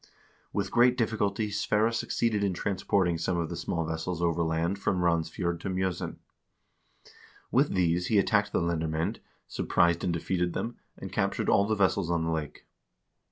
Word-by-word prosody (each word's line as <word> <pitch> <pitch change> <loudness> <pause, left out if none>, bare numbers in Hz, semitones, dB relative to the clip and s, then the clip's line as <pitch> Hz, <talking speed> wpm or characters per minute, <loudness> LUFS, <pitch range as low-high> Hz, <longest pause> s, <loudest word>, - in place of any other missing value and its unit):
With 100 -1 -2
great 125 +1 +4
difficulty 110 -2 0
Sverre 105 +2 +1
succeeded 115 -2 0
in 95 -3 0
transporting 95 -3 0
some 85 +2 0
of 85 -1 -1
the 85 - -4
small 85 0 -2
vessels 80 +2 -3
overland 85 +2 0
from 95 -2 0
Randsfjord 85 0 0
to 95 - -4
Mj0sen. 95 -1 -2 1.4
With - - +2
these 90 -1 +1
he 110 - +2
attacked 100 - +2
the - - +1
lendermcend, 80 -1 -1 0.3
surprised 85 0 +1
and 90 - +1
defeated 90 +1 -1
them, 120 - -4 0.2
and - - -8
captured - - 0
all 100 - +4
the 110 - +1
vessels 95 -3 +1
on 85 -1 +1
the 80 - -1
lake. 80 -2 -4
90 Hz, 160 wpm, -28 LUFS, 85-100 Hz, 1.4 s, great